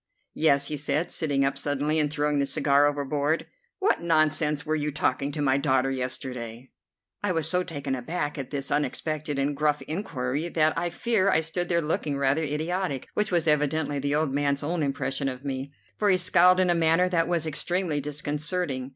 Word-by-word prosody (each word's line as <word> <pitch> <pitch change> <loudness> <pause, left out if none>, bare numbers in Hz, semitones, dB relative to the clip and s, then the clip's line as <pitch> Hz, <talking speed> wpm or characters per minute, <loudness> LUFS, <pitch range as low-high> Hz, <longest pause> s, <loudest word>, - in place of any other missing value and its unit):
"Yes," 140 -3 +2
he 150 - -2
said, 145 +3 -1
sitting 140 -4 +1
up 135 0 -1
suddenly 145 +2 0
and 150 -1 +1
throwing 150 -1 0
the 140 - +1
cigar 140 +1 +3
overboard. 145 +2 -1 0.3
"What 405 +1 +1
nonsense 155 -2 +2
were 155 0 0
you 150 -1 -1
talking 140 -1 -1
to 150 0 -3
my 135 -1 +3
daughter 135 -1 +1
yesterday?" 125 -2 -4 0.5
I 205 - 0
was 165 -3 +2
so 180 +2 +2
taken 145 -6 -4
aback 145 +4 -3
at 135 - -5
this 140 -1 -4
unexpected 150 +1 -2
and 140 +1 0
gruff 150 -1 +1
inquiry 150 -2 -3
that 155 -2 +2
I 175 +1 -1
fear 200 +2 +1
I 160 - +3
stood 175 +2 -2
there 170 -1 +2
looking 150 -2 -1
rather 140 +3 +2
idiotic, 155 0 -2
which 210 -1 0
was 170 -2 +1
evidently 150 -1 +1
the 145 +1 0
old 150 -3 0
man's 140 0 0
own 165 +3 -1
impression 140 -1 -2
of 130 +1 -8
me, 135 0 -4 0.3
for 210 - +3
he 185 - +5
scowled 180 0 +5
in 185 -1 +3
a - - +4
manner 165 +2 +3
that 165 -2 +1
was 170 -2 0
extremely 160 0 -1
disconcerting. 150 -1 -2
150 Hz, 190 wpm, -26 LUFS, 140-165 Hz, 0.5 s, he